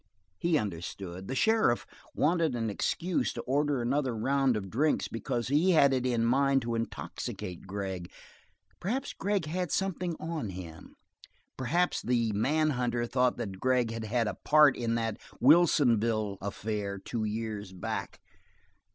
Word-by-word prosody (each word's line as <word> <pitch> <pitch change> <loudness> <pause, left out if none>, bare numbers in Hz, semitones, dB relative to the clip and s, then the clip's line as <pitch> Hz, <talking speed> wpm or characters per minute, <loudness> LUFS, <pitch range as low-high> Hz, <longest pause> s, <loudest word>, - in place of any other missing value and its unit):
He 170 -2 +2
understood. 95 - -5
The 135 - -3
sheriff 220 - +3 0.3
wanted 165 -3 +2
an 115 -2 -1
excuse 170 - -1
to - - -4
order 140 -1 0
another 130 -1 0
round 135 +1 +2
of 95 -3 -6
drinks 150 +7 +1
because 120 +1 -3
he 160 +7 +4
had 140 -4 +5
it 130 -1 0
in 115 -2 +1
mind 135 +2 +3
to 115 0 -2
intoxicate 95 -5 -5
Gregg; 95 -3 -4 0.7
perhaps 255 +9 -2
Glass 200 -3 -1
had 180 +2 -2
something 185 -3 -1
on 160 -9 -3
him; 90 -3 -9 0.6
perhaps 170 +8 0
the 120 -3 +1
manhunter 125 +1 +1
thought 125 +1 +1
that 95 -3 -6
Vic 125 -3 +2
had 115 -1 -4
had 115 +1 0
a - - -1
part 150 -2 +6
in 115 -1 -1
that 115 -2 -2 0.2
Wilsonville 115 - +4
affair 100 0 -3
two 110 +3 -4
years 105 -2 -4
back. 95 - -5
120 Hz, 145 wpm, -30 LUFS, 110-150 Hz, 0.7 s, part